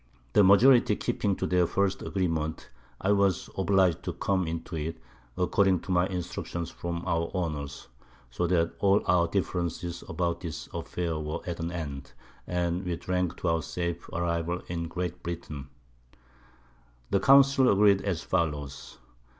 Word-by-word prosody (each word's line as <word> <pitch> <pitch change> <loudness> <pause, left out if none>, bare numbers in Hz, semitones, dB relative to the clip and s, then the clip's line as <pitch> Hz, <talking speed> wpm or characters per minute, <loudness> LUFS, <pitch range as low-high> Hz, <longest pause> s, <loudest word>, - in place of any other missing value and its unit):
The 105 - +6
Majority 110 +3 +6
keeping 100 -1 -1
to - - -2
their 90 -1 +2
first 100 +1 0
Agreement 80 -5 -2 0.3
I 100 - +1
was 100 -3 +2
obliged 95 -3 +2
to - - -4
come 95 -3 0
into 80 +1 -4
it, 80 +1 -4 0.4
according 95 0 +2
to - - -6
my 90 0 +3
Instructions 90 -2 -4
from 85 0 -5
our 85 -2 0
Owners; 75 -6 -3 0.4
so 90 +8 -1
that 85 -1 +1
all 100 0 +3
our 90 -1 +3
Differences 85 -2 -2
about 85 +1 -1
this 85 -4 -6
Affair 85 -3 -3
were 75 0 -4
at 85 -2 -4
an 85 +1 -3
end, 70 -6 -6 0.3
and 90 0 -1
we 90 -2 -2
drank 90 0 -2
to 90 - -1
our 80 0 +1
safe 85 0 -4
Arrival 85 +1 -2
in 85 -1 -3
Great 90 +1 -4
Britain. 75 -5 -6 1.4
The 100 - +3
Council 135 0 +6
agreed 100 -1 +5
as 90 -5 -2
follows. 75 -6 -2
85 Hz, 150 wpm, -28 LUFS, 85-95 Hz, 1.4 s, The